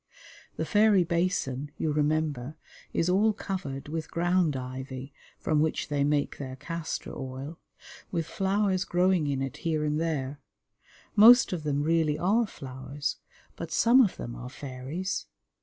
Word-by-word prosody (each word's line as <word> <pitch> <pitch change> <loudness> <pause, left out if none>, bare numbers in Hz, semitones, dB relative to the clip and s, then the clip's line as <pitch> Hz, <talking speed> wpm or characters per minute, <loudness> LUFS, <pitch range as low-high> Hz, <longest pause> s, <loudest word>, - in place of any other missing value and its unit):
The - - -2
Fairy 210 -3 +4
Basin, 170 -6 -1
you 155 - 0
remember, 150 -2 0 0.3
is 165 - +1
all 205 +4 +3
covered 180 -10 -5
with 160 +1 -4
ground 175 -3 +1
ivy 130 +1 -6 0.2
(from 155 -2 +1
which 155 +1 0
they 145 -1 +1
make 145 0 0
their 130 -2 -5
castor 165 +3 -5
oil), 135 +4 -6 0.5
with 165 -3 -1
flowers 195 +2 +1
growing 180 -3 +2
in 135 -1 -1
it 135 - -5
here 160 -2 -1
and 150 +1 0
there. 145 -4 -2 0.8
Most 235 +1 +8
of 175 - -2
them 145 -1 0
really 160 -1 +2
are 215 +6 +2
flowers, 135 -1 -5 0.4
but - - -6
some 245 +3 +6
of 210 -7 +2
them 120 - -6
are 125 - -7
fairies. 140 +8 -5
155 Hz, 145 wpm, -28 LUFS, 140-180 Hz, 0.8 s, Most